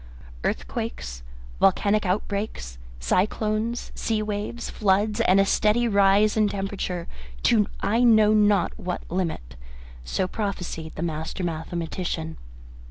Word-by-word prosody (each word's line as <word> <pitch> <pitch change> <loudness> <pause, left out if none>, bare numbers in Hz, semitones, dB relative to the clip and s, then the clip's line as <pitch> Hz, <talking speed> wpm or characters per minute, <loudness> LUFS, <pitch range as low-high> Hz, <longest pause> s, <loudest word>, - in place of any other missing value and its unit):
"Earthquakes, - - -3 0.4
volcanic 200 +2 +3
outbreaks, 185 - -3 0.2
cyclones, 215 - 0
sea 220 -1 -1
waves, 210 +3 -4
floods, 210 +2 +1
and 195 -3 +4
a 195 - +5
steady 215 +4 +2
rise 200 0 +4
in 215 -2 +3
temperature 195 -3 -3 0.4
to 210 -3 +4
I 230 +4 +2
know 220 -3 +6
not 205 -4 +3
what 180 -3 -4
limit" 165 - -3 0.5
so 185 - -1
prophesied 180 -6 -4
the 160 - -3
master 160 +3 -3
mathematician. 165 0 -3
195 Hz, 110 wpm, -25 LUFS, 170-215 Hz, 0.5 s, know